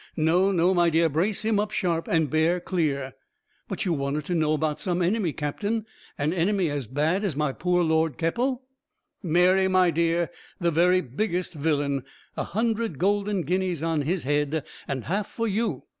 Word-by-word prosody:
No, 175 +5 +3
no, 180 0 +3
my 175 -2 +4
dear, 165 0 +3
brace 185 +9 0
him 215 -1 +2
up 210 0 0
sharp, 175 -6 -1
and 160 -2 +2
bear 160 +5 +2
clear." 145 -8 -1 0.5
"But - - -3
you 180 - +1
wanted 140 0 -2
to 180 - -2
know 155 -2 +2
about 155 -1 -1
some 180 -2 -1
enemy, 180 0 +1
captain. 205 +10 -2 0.3
An 150 +2 0
enemy 185 -1 +1
as 140 -5 -3
bad 155 - 0
as 190 -8 -1
my 150 -1 0
poor 180 +2 +1
Lord 160 -1 +1
Keppel?" 245 +10 -1 0.6
"Mary, 180 +3 +3
my 185 -2 +4
dear, 170 +1 +1 0.3
the 170 -1 +1
very 180 +3 +4
biggest 180 - -2
villain! 145 -3 0 0.3
A - - -2
hundred 225 - -1
golden 200 +1 +1
guineas 180 -3 -1
on 165 -2 +1
his 170 +5 -1
head, 145 +2 0 0.2
and 130 -3 -3
half 200 - -1
for 230 0 -3
you. 220 +3 -1
170 Hz, 175 wpm, -26 LUFS, 155-190 Hz, 0.6 s, my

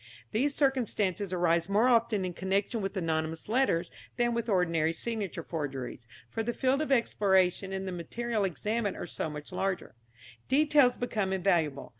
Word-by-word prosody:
These 275 +6 +1
circumstances 215 - 0
arise 170 -1 +1
more 210 +5 +4
often 230 -5 +3
in 180 - -3
connection 195 +5 -1
with 195 +1 -3
anonymous 160 -2 -2
letters 215 -8 +1 0.3
than 240 -1 +2
with 235 0 -2
ordinary 165 -4 +2
signature 200 -3 -4
forgeries, 135 -7 -5 0.2
for 225 - -3
the 240 +2 -2
field 265 +3 +2
of 305 - -2
exploration 195 -6 +2
and 190 0 -3
the - - -3
material 215 +6 -2
examined 210 +3 -1
are - - -4
so 160 - -3
much 150 -1 -8
larger. 190 -2 -2 0.5
Details 285 -2 +4
become 215 -6 -1
invaluable. 170 -7 +1
195 Hz, 155 wpm, -30 LUFS, 170-235 Hz, 0.5 s, more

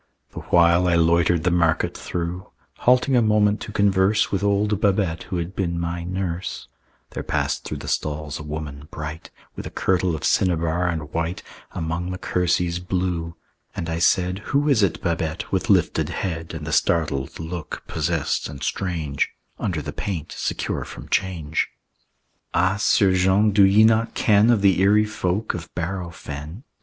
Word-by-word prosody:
The - - -7
while 85 +1 +4
I 85 - +3
loitered 85 0 +3
the 90 - +2
market 85 -2 +1
through, 90 +1 -4 0.3
Halting 125 +2 +3
a 120 - +5
moment 105 -1 +3
to - - -6
converse 100 0 +2
With 100 0 -1
old 100 0 +1
Babette 95 -5 +1
who 90 - -2
had 85 +3 -4
been 85 -3 -1
my 85 0 -3
nurse, 90 -3 -4 0.4
There - - -4
passed - - -1
through - - -4
the - - -8
stalls 75 0 -2
a - - -7
woman, 75 -1 -6
bright 80 0 -7 0.3
With - - -6
a - - -6
kirtle 90 -2 0
of 75 - -7
cinnabar 85 -1 +1
and 80 -3 -4
white 85 +2 -2 0.3
Among 85 0 -3
the 90 - -4
kerseys 90 -1 0
blue; 90 -2 -2 0.4
and 85 - -4
I 80 - -2
said, 90 +1 +2
"Who 145 +1 +1
is 130 -6 +4
it, 95 -3 0
Babette, 85 -2 -2
with 100 +5 -1
lifted 95 -4 +2
head, 80 -3 -4
"And 75 -1 -6
the 80 - -4
startled 75 -5 0
look, 80 0 -6
possessed 80 -2 -1
and 70 - -8
strange, 80 -7 -1 0.3
Under - - -2
the - - -5
paint 85 -6 -4
secure - - -2
from - - -10
change?" 80 -5 0 0.9
"Ah, 95 +3 +2
'Sieur 100 -1 +3
Jean, 95 +3 +3
do 100 0 +5
ye 100 +3 +6
not 115 +1 +3
ken 105 +1 +4
Of 115 -4 +3
the 95 -2 +4
eerie 105 +2 +5
folk 105 0 -2
of 85 0 -7
Bareau 90 +1 -3
Fen?" 80 - -8
90 Hz, 170 wpm, -23 LUFS, 80-100 Hz, 0.9 s, ye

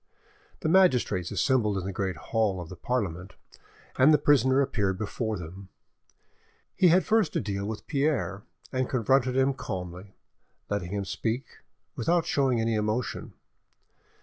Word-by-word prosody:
The 160 - -1
magistrates 130 - +3
assembled 105 -1 +1
in 95 - -3
the 95 - -4
great 95 -1 -2
hall 105 - 0
of 85 -2 -7
the 90 - -8
Parliament, 95 -4 -3 0.6
and 135 +4 +7
the 150 - +6
prisoner 135 -2 +3
appeared 105 -9 0
before 110 +1 -3
them. 90 +3 -9 1.1
He 185 - +5
had 180 +2 +4
first 220 -5 +2
to - - +1
deal 100 -1 -3
with 110 0 -6
Pierre, 140 - 0 0.3
and 130 -1 0
confronted 130 +1 +2
him 135 +1 +3
calmly, 90 -4 -7 0.6
letting 100 -4 -2
him 100 -1 -2
speak, 115 +6 -2 0.5
without 170 +8 +1
showing 130 -4 +1
any 115 0 0
emotion. 110 +3 -2
110 Hz, 145 wpm, -27 LUFS, 95-135 Hz, 1.1 s, and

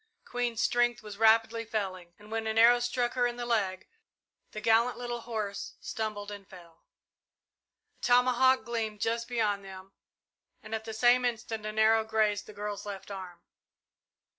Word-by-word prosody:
Queen's 240 -2 -2
strength 240 -2 +1
was 210 -1 -9
rapidly 225 +1 +4
failing, 185 -6 -4
and 210 +1 -16
when 225 0 -2
an 220 0 -1
arrow 235 +2 +7
struck 240 0 -1
her 245 -1 +2
in 240 - -4
the 240 0 -5
leg, 200 -6 -1 0.6
the 215 - -7
gallant 225 +3 +3
little 240 -1 -4
horse 215 -4 -5
stumbled 210 -2 -4
and 200 -2 -9
fell. 170 -3 -15
A - - -48
tomahawk 250 +1 +4
gleamed 220 -2 -3
just 230 +2 -1
beyond 215 -5 0
them 190 0 -11 0.7
and 215 - -8
at 220 0 -3
the 220 - -6
same 245 +2 +4
instant 225 -2 -3
an 215 0 -6
arrow 220 0 +5
grazed 215 -2 0
the - - -9
girl's 205 0 -5
left 200 0 -7
arm. 185 -3 -8
220 Hz, 165 wpm, -30 LUFS, 205-240 Hz, 0.7 s, arrow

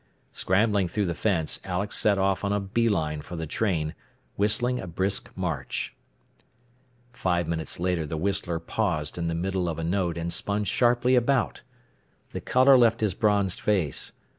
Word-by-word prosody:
Scrambling 100 0 +2
through 100 +4 -1
the 85 - -1
fence, 85 -5 0
Alex 95 +3 -2
set 105 -2 +3
off 95 0 +1
on 100 - 0
a 105 - +1
bee 110 +4 0
line 75 -6 -1
for 85 - -8
the 80 -1 -3
train, 80 -3 -1 0.4
whistling 120 +5 +1
a 95 - -6
brisk 95 +3 -1
march. 80 -8 -3 1.2
Five 85 -7 0
minutes 80 -1 -3
later 90 -3 0
the 80 - -3
whistler 95 -1 -1
paused 85 -3 -2
in 85 - -1
the 85 - -1
middle 90 +1 -1
of 80 - -4
a 80 - -3
note 85 -1 0
and 85 0 -2
spun 105 +1 -1
sharply 120 +3 +2
about. 125 0 +2 0.7
The - - -5
color 130 +1 +5
left 115 -1 +4
his 105 -4 +2
bronzed 100 -3 +1
face. 90 -10 0
95 Hz, 165 wpm, -26 LUFS, 85-105 Hz, 1.2 s, color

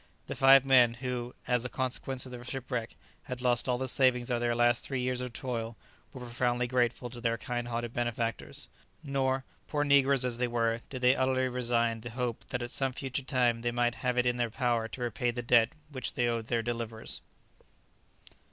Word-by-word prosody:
The - - -5
five 135 0 +6
men, 125 -3 +5
who, 125 -1 -4
as 125 -1 +2
the 125 - -3
consequence 130 +1 -2
of 130 - -10
the 120 -1 -8
shipwreck, 125 -2 -4 0.3
had 125 -1 -5
lost 125 0 +1
all 125 - +2
the 130 +1 -2
savings 125 -1 +3
of 120 - +1
their 120 0 0
last 120 0 +3
three 135 -2 -2
years 125 0 -1
of 125 -1 -4
toil, 115 -2 -4 0.3
were 130 - -10
profoundly 120 0 0
grateful 120 0 0
to 120 -1 -8
their 115 -1 0
kind 120 -1 -4
hearted 120 0 -3
benefactors; 120 -1 -3 0.4
nor, 135 -2 0 0.2
poor 145 -1 0
negroes 140 -2 +4
as 120 -1 -1
they 125 - +1
were, 115 -1 0
did 130 -2 -6
they 125 +1 +5
utterly 130 0 +1
resign 120 -2 +1
the 120 - -7
hope 120 0 -3
that 125 -1 -3
at 120 - -5
some 135 -1 0
future 135 +1 -3
time 125 -4 +1
they 120 - 0
might 120 0 +1
have 125 +1 -2
it 125 - +3
in 125 0 +1
their 120 -1 0
power 120 -1 0
to 125 - -8
repay 120 +1 -1
the 120 0 -3
debt 120 -1 +5 0.2
which 130 -4 -3
they 120 - +1
owed 115 -2 -2
their 115 -1 0
deliverers. 115 -1 -4
120 Hz, 205 wpm, -30 LUFS, 120-130 Hz, 0.4 s, five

